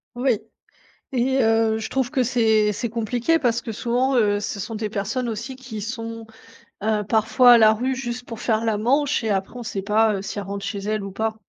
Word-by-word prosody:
Oui 245 -3 +1 0.7
et 260 +2 +2
heu, 225 -1 +2
je 220 - -5
trouve 265 -2 -1
que 265 -4 +1
c'est 220 -3 +2
c'est 235 +3 -3
compliqué 240 +8 0
parce 235 -3 +1
que, 225 - -6
souvent, 245 +4 0
heu, 205 -2 +3
ce 205 0 -4
sont 225 +4 -5
des 215 -1 -3
personnes, 225 +4 -2
aussi, 235 +5 -5
qui 250 -5 -8
sont, 225 0 -6 0.6
heu, 215 -1 +1
parfois 225 +3 +5
à - - +8
la 220 0 +6
rue 255 +4 -1
juste 245 -1 -5
pour 230 -2 -8
faire 225 -1 0
la 220 -2 +1
manche 270 +4 +1
et 220 - -1
après 195 +4 -2
on - - -6
sait 200 -3 -4
pas, 215 +1 +3
heu, 190 - -4
si 205 +1 -5
elles 200 - -6
rentrent 200 0 -5
chez 200 - -3
elles 210 0 -2
ou 195 - -6
pas. 220 +3 -2
225 Hz, 225 wpm, -23 LUFS, 215-245 Hz, 0.7 s, à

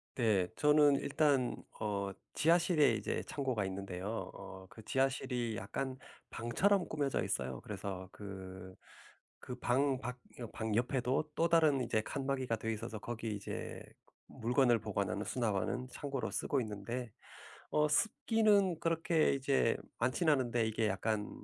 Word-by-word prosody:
네. 105 -7 +3
저는 150 -1 +5
일단 140 -3 +2 0.2
어 100 -2 -1 0.2
지하실에 165 -1 +4
이제 - - -2
창고가 130 -8 -1
있는데요. 95 +2 -4
어 100 -1 -9
그 110 - -13
지하실이 130 -2 0
약간 130 +7 -3 0.3
방처럼 185 - +2
꾸며져 145 -3 0
있어요. 65 -1 -2
그래서 95 -2 -5
그, 95 -2 -8 0.6
그 125 - -6
방 130 +2 +2
밖 125 +1 -4 0.2
여 120 - -4
방 110 -2 -2
옆에도 130 +4 +1
또 165 - +3
다른 155 -5 +4
이제 110 -3 +1
칸막이가 130 -2 -2
돼 115 +1 -2
있어서 110 0 -5
거기 115 -1 -4
이제 100 - -5 0.5
물건을 120 0 +2
보관하는, 100 -2 -2
수납하는 120 +2 -1
창고로 140 -1 -3
쓰고 140 - 0
있는데 115 +2 -4 0.6
어 150 0 +3
습기는 205 +1 +3
그렇게 165 -2 +2
이제 135 -3 +2 0.2
많지는 150 +6 +3
않은데 120 -4 +1
이게 110 0 0
약간 105 +1 -1
125 Hz, 290 characters per minute, -34 LUFS, 105-140 Hz, 0.6 s, 저는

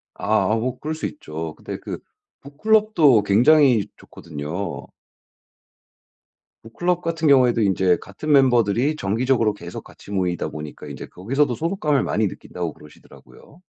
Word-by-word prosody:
아 105 +4 +1
어 115 +3 -1
그럴 155 +1 -4
수 155 - -5
있죠. 80 - -7
근데 - - -7
그 - - -6 0.4
북클럽도 155 - +3
굉장히 120 +2 +4
좋거든요. 80 +4 -6 1.8
북클럽 175 +10 -1
같은 165 -2 -1
경우에도 130 -4 +5
인제 95 -3 +2
같은 125 +10 -5
멤버들이 125 0 +3
정기적으로 115 0 +1
계속 85 -4 -9
같이 100 - -15
모이다 90 -4 -1
보니까 75 0 -8
인제 - - -8
거기서도 125 +8 -1
소속감을 160 - 0
많이 110 0 0
느낀다고 90 -2 -6
그러시더라고요. 145 - -18
120 Hz, 330 characters per minute, -22 LUFS, 95-150 Hz, 1.8 s, 경우에도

